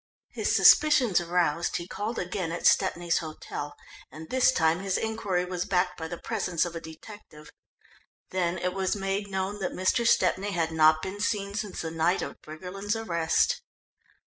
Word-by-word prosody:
His - - 0
suspicions 260 - +6
aroused, 170 -1 0
he 170 - -7
called 215 +5 -4
again 180 -1 -3
at 170 - -5
Stepney's 170 0 +3
hotel, 155 -2 -7 0.4
and 155 +3 -10
this 260 0 +4
time 160 -6 +2
his 195 -1 -1
inquiry 210 -5 -1
was 180 -1 -3
backed 180 -1 +1
by 160 - -4
the 175 +1 -6
presence 185 -7 -1
of 170 -1 -6
a 165 - -5
detective. 160 -1 -12 0.8
Then 180 -1 0
it 180 0 -2
was 190 0 -1
made 195 +1 -2
known 195 +1 -3
that 190 - -3
Mr. 185 +5 +1
Stepney 200 -2 +2
had 165 -2 0
not 155 0 +4
been 190 +2 -5
seen 200 -2 -1
since 210 -2 -4
the 160 - -4
night 165 +3 +1
of - - -8
Briggerland's 185 +7 -5
arrest. 225 - +1
180 Hz, 170 wpm, -27 LUFS, 165-200 Hz, 0.8 s, suspicions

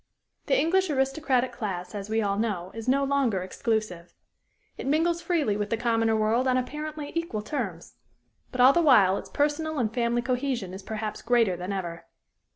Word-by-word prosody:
The - - +3
English 375 +3 +2
aristocratic 265 -2 +1
class, 190 -6 -5
as 205 0 -6
we 220 0 +1
all 200 -1 0
know, 190 -5 -2
is 225 +1 -7
no 275 +2 +3
longer 270 -9 +1
exclusive. 185 -3 -3 0.6
It - - -6
mingles 335 +4 +2
freely 325 - 0
with 205 0 -2
the 230 - 0
commoner 225 -1 +1
world 220 +4 +2
on 255 0 +3
apparently 300 +3 -4
equal 335 -11 -3
terms. 210 - -5 0.5
But 255 - 0
all 260 +2 +8
the 345 - +3
while 205 - +5
its - - -11
personal 300 +2 0
and 225 -4 0
family 240 -1 0
cohesion 250 -6 -2
is 190 - -7
perhaps 215 +1 -5
greater 230 -6 +2
than 180 +3 -5
ever. 175 -4 -5
235 Hz, 175 wpm, -27 LUFS, 205-280 Hz, 0.6 s, all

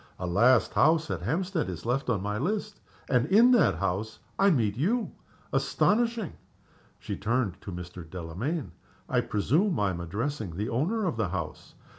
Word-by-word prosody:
A 90 - -4
last 115 +8 +4
house 160 +1 +3
at 85 - -3
Hampstead 165 - -1
is 90 +1 -7
left 125 +2 0
on 105 -6 0
my 105 +1 -2
list 210 - -2 0.3
and 125 0 +2
in 225 +7 +6
that 240 - +4
house 100 +5 -2 0.2
I 195 - +6
meet 115 - +2
you. 210 - 0 0.4
Astonishing!" 230 -3 +1 0.6
She - - -5
turned 105 -4 -1
to 100 - -7
Mr. 90 -1 -8
Delamayn. 95 - -4 0.4
"I - - +2
presume 155 - +1
I 100 -2 +2
am 85 - -5
addressing 105 - -3
the 105 +4 -2
owner 180 - 0
of 160 -11 -1
the 110 -5 0
house?" 85 -4 -6
120 Hz, 165 wpm, -28 LUFS, -, 0.6 s, in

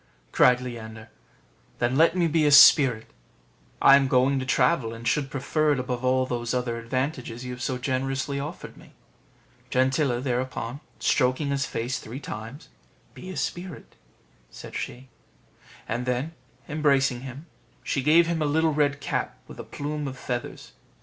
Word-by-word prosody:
cried 125 0 +5
Leander, 110 -3 -8 0.7
"then 120 +2 0
let 165 +4 +4
me 175 - +3
be 155 -1 +2
a - - +3
spirit; 135 -5 +7 0.7
I 135 - +8
am 140 -1 +3
going 130 +1 +2
to 130 - -5
travel, 125 -5 +1
and 115 +1 -7
should 140 -2 0
prefer 150 +2 0
it 135 - -2
above 125 -1 -4
all 130 0 +2
those 120 -1 -3
other 120 -2 -2
advantages 130 0 -4
you 125 - -5
have 125 0 -8
so 130 0 -2
generously 135 +2 -2
offered 150 +5 -7
me." - - -17 0.8
Gentilla 130 0 +1
thereupon 125 0 -3 0.2
stroking 130 +3 +1
his 140 -1 -1
face 120 +3 -3
three 120 +5 -8
times, 115 +4 -8 0.4
"Be 185 - -10
a 185 - -6
spirit," 175 -2 -5 0.6
said - - -11
she; 130 +1 -6 0.8
and 120 +3 -3
then, 125 +6 -2 0.3
embracing 140 -4 +1
him, 135 +4 -9 0.4
she 135 - -1
gave 160 +5 +5
him 165 -1 -2
a - - +1
little 160 +2 +2
red 145 -1 +1
cap - - -3
with - - -12
a - - -5
plume 150 0 -5
of 135 -1 -7
feathers. 120 -1 -5
130 Hz, 160 wpm, -25 LUFS, 125-145 Hz, 0.8 s, I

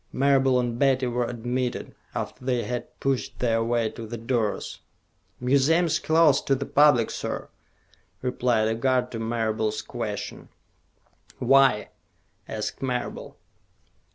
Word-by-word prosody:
Marable 135 -1 +3
and 120 -1 -2
Betty 135 -2 +3
were 120 0 -1
admitted, 125 +1 -3 0.2
after - - -5
they 125 -2 0
had 125 -1 -5
pushed 135 -2 -1
their 115 -2 +1
way 115 -1 +1
to 115 -1 -8
the 120 +2 -5
doors. 115 -2 -2 0.6
"Museum's 155 +6 +3
closed 160 -3 +3
to 135 - +4
the 140 +1 -4
public, 140 -7 +4
sir," - - -4 0.7
replied 125 -3 +1
a 110 - +1
guard 125 +1 +1
to 115 - -5
Marable's 110 -1 -1
question. 105 -2 -5 0.9
"Why?" 135 -6 +4 0.6
asked 105 - -4
Marable. 125 -2 -4
125 Hz, 125 wpm, -25 LUFS, 115-135 Hz, 0.9 s, to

